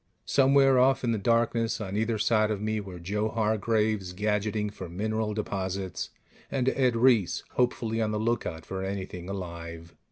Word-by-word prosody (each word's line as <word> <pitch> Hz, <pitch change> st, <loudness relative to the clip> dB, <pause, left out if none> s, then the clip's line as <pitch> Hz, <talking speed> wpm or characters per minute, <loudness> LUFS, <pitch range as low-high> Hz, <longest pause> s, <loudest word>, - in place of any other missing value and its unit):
Somewhere 135 Hz, -1 st, +5 dB
off 135 Hz, +1 st, +4 dB
in 120 Hz, -, +1 dB
the 110 Hz, -, 0 dB
darkness 115 Hz, +1 st, +1 dB
on 100 Hz, -2 st, -4 dB
either 110 Hz, +1 st, 0 dB
side 110 Hz, 0 st, +2 dB
of 105 Hz, -2 st, -1 dB
me 110 Hz, +1 st, -1 dB
were 95 Hz, -3 st, -7 dB
Joe 105 Hz, +5 st, -1 dB
Hargraves, 110 Hz, -3 st, 0 dB
gadgeting 105 Hz, +1 st, -1 dB
for 95 Hz, -4 st, -8 dB
mineral 110 Hz, +4 st, -2 dB
deposits, 95 Hz, -, -3 dB, 0.4 s
and 130 Hz, -2 st, -1 dB
Ed 130 Hz, -3 st, +2 dB
Reiss, 115 Hz, -5 st, +3 dB
hopefully 115 Hz, -2 st, 0 dB
on 110 Hz, -, +1 dB
the 105 Hz, -, -1 dB
lookout 105 Hz, -7 st, -1 dB
for 95 Hz, 0 st, -4 dB
anything 95 Hz, -2 st, -5 dB
alive. 85 Hz, -3 st, -7 dB
105 Hz, 160 wpm, -28 LUFS, 95-115 Hz, 0.4 s, Somewhere